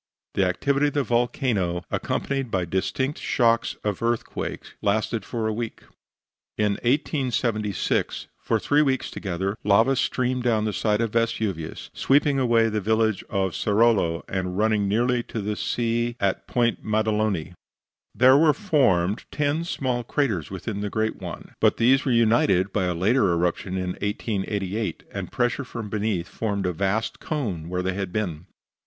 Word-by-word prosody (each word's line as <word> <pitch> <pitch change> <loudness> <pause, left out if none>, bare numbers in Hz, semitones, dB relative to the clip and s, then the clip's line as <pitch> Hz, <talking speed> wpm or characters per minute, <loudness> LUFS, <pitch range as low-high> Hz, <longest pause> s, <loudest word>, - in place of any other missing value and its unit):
The 95 - +2
activity 140 +10 +1
of 145 - -4
the 145 - +2
volcano, 115 -7 0
accompanied 135 -3 -2
by 95 -4 0
distinct 115 - -1
shocks 115 -3 +2
of 105 -3 -2
earthquake, 115 0 -2 0.2
lasted 110 +2 0
for 115 -2 -3
a 110 - 0
week. 115 0 -5 0.7
In 105 -1 +1
1876, 120 - 0
for - - 0
three 145 +1 +3
weeks 135 -3 0
together, 95 +1 -3
lava 115 +7 +4
streamed 125 0 0
down 115 -3 +1
the 105 - -1
side 105 +1 +1
of 115 -2 0
Vesuvius, 110 -8 -2
sweeping 140 0 +3
away 115 -3 +3
the 110 -1 -1
village 110 0 +1
of 95 -3 0
Cercolo 105 -6 +2
and 90 -1 -3
running 105 -1 +2
nearly 120 +4 +2
to 115 - -6
the 105 +1 -2
sea 120 +1 -1
at 100 -1 -1
Ponte 120 -2 0
Maddaloni. 105 -5 0 0.6
There 130 +2 +6
were 155 -1 +5
then 205 +3 -15
formed 105 - +3
ten 150 +2 0
small 130 -7 -2
craters 115 - -1
within 100 +2 -5
the 105 - -2
greater 110 +1 -1
one. - - -8
But - - +3
these 130 +4 +4
were 135 - +1
united 110 -5 +3
by 100 -3 +1
a 90 -1 -1
later 100 +3 +3
eruption 90 +2 -1
in 90 -1 -2
1888, 105 -2 -2
and - - -5
pressure 120 +3 0
from 115 -5 -7
beneath 105 -5 -1
formed 100 -3 -2
a 90 - 0
vast 100 +6 -1
cone 100 - -3
where 90 0 -2
they 95 0 -1
had 95 -1 -3
been. 90 -5 -3
110 Hz, 160 wpm, -24 LUFS, 95-120 Hz, 0.7 s, There